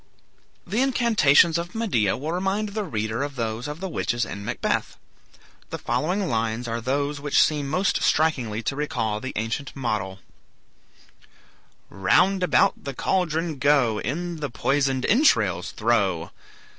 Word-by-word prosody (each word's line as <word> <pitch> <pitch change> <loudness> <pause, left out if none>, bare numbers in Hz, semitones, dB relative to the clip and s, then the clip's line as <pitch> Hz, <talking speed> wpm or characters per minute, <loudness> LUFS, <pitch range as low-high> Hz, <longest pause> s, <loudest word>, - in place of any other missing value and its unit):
The 225 - -1
incantations 205 - +4
of 175 +3 -6
Medea 125 - +1
will 150 +5 -4
remind 195 +4 -1
the 210 +1 -3
reader 110 - -3
of 140 0 -4
those 115 +1 -3
of 150 +2 -6
the 190 - -3
witches 120 -8 -1
in 100 - -7
"Macbeth." - - -2 0.7
The - - -4
following 185 +5 -1
lines 115 -1 -1
are 115 0 -3
those 140 +4 -1
which 145 -1 +2
seem 150 -2 +2
most 185 +6 +1
strikingly 125 -9 +1
to 135 - -2
recall 110 -8 -2
the 130 +3 -6
ancient 115 +6 -3
model: 105 -8 -2 1.7
"Round 185 - +3
about 180 - +2
the 140 -2 -5
caldron 165 -4 -1
go; 135 -7 +3
In 170 +6 -3
the 145 -2 -4
poisoned 135 +2 0
entrails 110 - +3
throw. 100 -7 0
140 Hz, 140 wpm, -24 LUFS, 115-170 Hz, 1.7 s, incantations